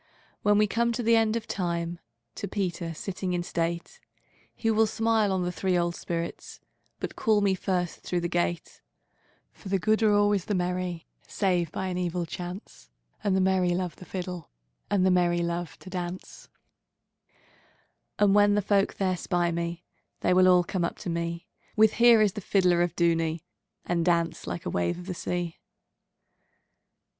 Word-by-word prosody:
When 205 Hz, 0 st, +4 dB
we 210 Hz, -, +5 dB
come 235 Hz, +3 st, +1 dB
at 235 Hz, -, -1 dB
the 230 Hz, -1 st, +3 dB
end 225 Hz, -1 st, +3 dB
of 230 Hz, -2 st, -3 dB
time, 170 Hz, -2 st, -2 dB, 0.3 s
To 200 Hz, -, -5 dB
Peter 180 Hz, -4 st, -3 dB
sitting 185 Hz, +2 st, -4 dB
in 175 Hz, -1 st, -1 dB
state, 170 Hz, 0 st, -3 dB, 0.6 s
He 225 Hz, -, 0 dB
will 220 Hz, 0 st, +3 dB
smile 220 Hz, -1 st, +1 dB
on 185 Hz, -1 st, 0 dB
the 180 Hz, -, -1 dB
three 185 Hz, 0 st, 0 dB
old 170 Hz, 0 st, 0 dB
spirits, 170 Hz, 0 st, -5 dB, 0.4 s
But -, -, -5 dB
call 215 Hz, -1 st, +2 dB
me 200 Hz, -1 st, +2 dB
first 180 Hz, -2 st, -2 dB
through 175 Hz, -1 st, -2 dB
the 170 Hz, -, -1 dB
gate; 175 Hz, -1 st, -2 dB, 0.7 s
For 195 Hz, -, -11 dB
the 195 Hz, -, +2 dB
good 215 Hz, +4 st, +1 dB
are 215 Hz, -1 st, +4 dB
always 205 Hz, -2 st, +3 dB
the 210 Hz, -, -1 dB
merry, 180 Hz, -1 st, -2 dB, 0.2 s
Save 180 Hz, -5 st, 0 dB
by 190 Hz, -, -3 dB
an 180 Hz, -1 st, -2 dB
evil 175 Hz, -1 st, -1 dB
chance, 175 Hz, -, -8 dB, 0.3 s
And 195 Hz, -2 st, +2 dB
the 190 Hz, -, +3 dB
merry 185 Hz, -2 st, +2 dB
love 180 Hz, -1 st, -3 dB
the 185 Hz, -, -12 dB
fiddleAnd 180 Hz, -3 st, -5 dB, 0.6 s
the 190 Hz, -, +4 dB
merry 175 Hz, -1 st, +2 dB
love 170 Hz, -1 st, -3 dB
to -, -, -17 dB
dance:And 185 Hz, +2 st, -6 dB
when 205 Hz, 0 st, +5 dB
the 210 Hz, -, +1 dB
folk 200 Hz, 0 st, +2 dB
there 185 Hz, -2 st, 0 dB
spy 175 Hz, -1 st, 0 dB
me, 170 Hz, +1 st, -3 dB, 0.4 s
They 180 Hz, -, +3 dB
will 185 Hz, 0 st, +5 dB
all 180 Hz, -1 st, +6 dB
come 175 Hz, 0 st, -2 dB
up 170 Hz, -, -2 dB
to 175 Hz, -, -4 dB
me, 170 Hz, 0 st, -3 dB, 0.3 s
With 220 Hz, 0 st, +5 dB
'Here 235 Hz, -2 st, +6 dB
is 205 Hz, -3 st, +2 dB
the 210 Hz, -, -5 dB
fiddler 180 Hz, -2 st, +3 dB
of 175 Hz, -1 st, 0 dB
Dooney!'And 170 Hz, +1 st, -1 dB
dance 170 Hz, -, 0 dB
like 85 Hz, 0 st, -5 dB
a -, -, -2 dB
wave 85 Hz, -, 0 dB
of 180 Hz, -, -9 dB
the 185 Hz, -, -4 dB
sea. 175 Hz, -1 st, -3 dB
180 Hz, 170 wpm, -27 LUFS, 170-200 Hz, 0.7 s, all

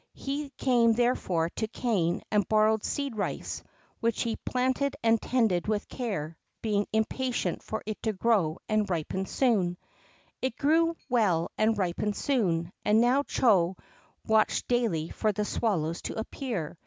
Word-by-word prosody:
He 280 Hz, +1 st, -4 dB
came, 235 Hz, -3 st, +4 dB
therefore, 190 Hz, -9 st, +1 dB
to 220 Hz, -, -3 dB
Kané 200 Hz, -7 st, 0 dB
and 205 Hz, -3 st, +2 dB
borrowed 215 Hz, 0 st, +3 dB
seed 280 Hz, -4 st, -2 dB
rice, 205 Hz, -, -3 dB, 0.4 s
which 230 Hz, -2 st, 0 dB
he 230 Hz, -2 st, -1 dB
planted 260 Hz, +2 st, -1 dB
and 225 Hz, -1 st, +3 dB
tended 220 Hz, -9 st, +1 dB
with 215 Hz, -1 st, -1 dB
care, 165 Hz, -, -4 dB, 0.2 s
being 205 Hz, -2 st, +1 dB
impatient 240 Hz, +3 st, -1 dB
for 220 Hz, -, -5 dB
it 215 Hz, 0 st, -5 dB
to 220 Hz, -, 0 dB
grow 190 Hz, -6 st, +2 dB
and 215 Hz, -2 st, +1 dB
ripen 185 Hz, +2 st, -2 dB
soon. 195 Hz, -9 st, +1 dB, 0.6 s
It 260 Hz, -2 st, -2 dB
grew 330 Hz, +3 st, +3 dB
well 205 Hz, -10 st, +2 dB
and 220 Hz, 0 st, +2 dB
ripened 200 Hz, +2 st, -1 dB
soon, 180 Hz, -11 st, 0 dB
and 210 Hz, +1 st, +4 dB
now 245 Hz, +4 st, +4 dB
Chô 190 Hz, -9 st, +2 dB, 0.5 s
watched 220 Hz, -1 st, +2 dB
daily 220 Hz, -11 st, 0 dB
for 215 Hz, -, 0 dB
the 210 Hz, +1 st, -2 dB
swallows 170 Hz, -8 st, -1 dB
to -, -, -5 dB
appear. 220 Hz, -, -4 dB
220 Hz, 145 wpm, -28 LUFS, 190-245 Hz, 0.6 s, came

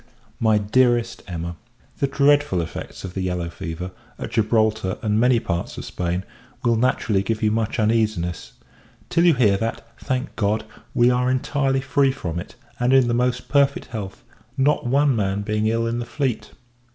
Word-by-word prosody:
MY 110 Hz, -2 st, +4 dB
DEAREST 120 Hz, +2 st, +2 dB
EMMA, 85 Hz, -1 st, -5 dB, 0.4 s
The 140 Hz, -, +2 dB
dreadful 145 Hz, -7 st, +3 dB
effects 85 Hz, -, -6 dB
of 95 Hz, -2 st, -6 dB
the 95 Hz, -, -3 dB
yellow 90 Hz, -2 st, -2 dB
fever, 85 Hz, +3 st, -6 dB, 0.3 s
at -, -, -6 dB
Gibraltar, 110 Hz, -3 st, +1 dB
and 105 Hz, 0 st, +1 dB
many 125 Hz, 0 st, +4 dB
parts 85 Hz, -5 st, -3 dB
of -, -, -6 dB
Spain, 90 Hz, +1 st, -2 dB, 0.4 s
will 120 Hz, -1 st, +3 dB
naturally 110 Hz, -4 st, +1 dB
give 110 Hz, +2 st, -2 dB
you 105 Hz, -, +3 dB
much 110 Hz, +1 st, -1 dB
uneasiness; 110 Hz, -6 st, 0 dB, 0.6 s
till 170 Hz, +1 st, +3 dB
you 170 Hz, -4 st, +6 dB
hear 105 Hz, -6 st, +4 dB
that, 115 Hz, +1 st, -3 dB
thank 130 Hz, +1 st, -3 dB
God, 105 Hz, 0 st, 0 dB, 0.3 s
we 120 Hz, 0 st, +5 dB
are 125 Hz, 0 st, +1 dB
entirely 135 Hz, +1 st, +1 dB
free 140 Hz, 0 st, +2 dB
from 85 Hz, -10 st, -4 dB
it, -, -, -9 dB, 0.2 s
and 125 Hz, +2 st, +2 dB
in 130 Hz, -2 st, +5 dB
the 120 Hz, -, +1 dB
most 125 Hz, +1 st, 0 dB
perfect 140 Hz, -1 st, +2 dB
health, 105 Hz, -5 st, -6 dB, 0.3 s
not 135 Hz, -2 st, +2 dB
one 140 Hz, +1 st, +3 dB
man 100 Hz, -1 st, -1 dB
being 105 Hz, +1 st, 0 dB
ill 115 Hz, +1 st, +1 dB
in 115 Hz, +1 st, -1 dB
the 120 Hz, -, -3 dB
fleet. 125 Hz, -2 st, -2 dB
115 Hz, 175 wpm, -22 LUFS, 100-130 Hz, 0.6 s, you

